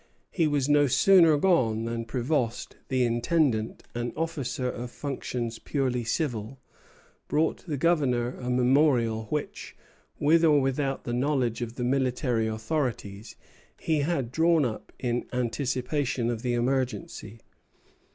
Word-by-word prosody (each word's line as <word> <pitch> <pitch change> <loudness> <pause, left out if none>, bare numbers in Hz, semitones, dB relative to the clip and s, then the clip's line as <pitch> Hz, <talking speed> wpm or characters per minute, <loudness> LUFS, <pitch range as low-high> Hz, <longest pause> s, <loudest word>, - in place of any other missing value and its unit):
He 165 -4 +1
was 145 -3 0
no 145 -1 +4
sooner 165 +4 +5
gone 125 -11 +2
than 115 0 -3
Prévost, 125 0 -1 0.2
the 130 -1 +1
intendant, 120 -1 0
an 120 0 -3
officer 145 -6 -2
of 125 0 -5
functions 125 -4 -4
purely 130 -4 -1
civil, 120 -2 -3 0.7
brought 155 +1 0
the 150 -3 -2
Governor 130 -6 +1
a 125 - -4
memorial 125 -3 +2
which, 150 +7 -5 0.4
with 160 +3 +4
or 150 -3 +5
without 135 0 -1
the 120 - -4
knowledge 125 -2 0
of 120 0 -5
the 125 - -4
military 125 -2 0
authorities, 110 -3 -3 0.4
he 160 -2 0
had 140 -5 -1
drawn 165 0 +3
up 110 -3 -5
in 120 -1 -2
anticipation 125 0 -1
of 115 -2 -4
the 120 -1 -1
emergency. 125 -2 -2
130 Hz, 130 wpm, -27 LUFS, 120-145 Hz, 0.7 s, sooner